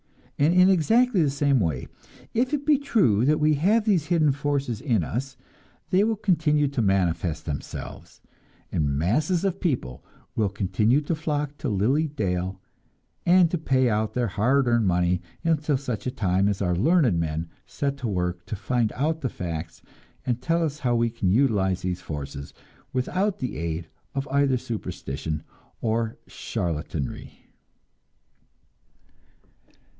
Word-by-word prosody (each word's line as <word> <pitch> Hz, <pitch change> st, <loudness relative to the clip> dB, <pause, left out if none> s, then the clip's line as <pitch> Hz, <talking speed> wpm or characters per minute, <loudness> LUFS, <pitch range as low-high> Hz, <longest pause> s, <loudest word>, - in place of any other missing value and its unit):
And 155 Hz, +5 st, +4 dB
in 180 Hz, +1 st, +7 dB
exactly 220 Hz, +4 st, +3 dB
the 150 Hz, -, +3 dB
same 140 Hz, -1 st, +2 dB
way, 80 Hz, -, -1 dB, 0.5 s
if 245 Hz, +3 st, +1 dB
it 290 Hz, -1 st, -1 dB
be 295 Hz, -2 st, +4 dB
true 160 Hz, -, +2 dB
that 150 Hz, +2 st, +3 dB
we 155 Hz, 0 st, +4 dB
have 205 Hz, +9 st, +2 dB
these 180 Hz, -8 st, +2 dB
hidden 160 Hz, -4 st, +3 dB
forces 140 Hz, -5 st, -2 dB
in 115 Hz, -, +1 dB
us, 130 Hz, -, -4 dB, 0.5 s
they 185 Hz, +2 st, +4 dB
will 220 Hz, +1 st, +1 dB
continue 155 Hz, -7 st, +2 dB
to 135 Hz, -3 st, -1 dB
manifest 90 Hz, -5 st, 0 dB
themselves, 75 Hz, -3 st, -7 dB, 0.5 s
and 70 Hz, -3 st, 0 dB
masses 150 Hz, -, +1 dB
of 190 Hz, -, -1 dB
people 120 Hz, -, -2 dB, 0.3 s
will 105 Hz, -3 st, +1 dB
continue 105 Hz, +7 st, +1 dB
to 150 Hz, +3 st, -2 dB
flock 150 Hz, -2 st, -2 dB
to 140 Hz, -, -2 dB
Lily 125 Hz, +10 st, +2 dB
Dale, 95 Hz, -8 st, -2 dB, 0.7 s
and 175 Hz, -1 st, +5 dB
to 175 Hz, -, -1 dB
pay 130 Hz, -4 st, +2 dB
out 110 Hz, -1 st, 0 dB
their 120 Hz, -3 st, +1 dB
hard 125 Hz, +7 st, +2 dB
earned 120 Hz, -3 st, +3 dB
money, 90 Hz, 0 st, +2 dB, 0.2 s
until 155 Hz, -3 st, +1 dB
such 125 Hz, -4 st, -4 dB
a -, -, 0 dB
time 95 Hz, -3 st, +1 dB
as 100 Hz, -1 st, 0 dB
our 90 Hz, -1 st, +1 dB
learned 125 Hz, -, +3 dB
men 80 Hz, 0 st, -2 dB, 0.2 s
set 140 Hz, -1 st, -2 dB
to 130 Hz, -3 st, -3 dB
work 90 Hz, -3 st, -2 dB
to -, -, -3 dB
find 115 Hz, +2 st, 0 dB
out 160 Hz, +4 st, -1 dB
the 130 Hz, -, -1 dB
facts 85 Hz, -3 st, -6 dB, 0.4 s
and 125 Hz, -1 st, -1 dB
tell 165 Hz, +3 st, +1 dB
us 150 Hz, -2 st, -2 dB
how 120 Hz, -4 st, +1 dB
we 115 Hz, 0 st, +1 dB
can 105 Hz, -5 st, -1 dB
utilize 100 Hz, -6 st, +2 dB
these 90 Hz, 0 st, -2 dB
forces 70 Hz, -4 st, -7 dB, 0.4 s
without 185 Hz, +10 st, 0 dB
the 125 Hz, -, -4 dB
aid 80 Hz, +1 st, -3 dB, 0.3 s
of 135 Hz, +1 st, -2 dB
either 140 Hz, -2 st, +3 dB
superstition 85 Hz, -, -5 dB, 0.4 s
or 115 Hz, 0 st, -1 dB
charlatanry. 80 Hz, -4 st, -4 dB
125 Hz, 150 wpm, -25 LUFS, 90-150 Hz, 0.7 s, in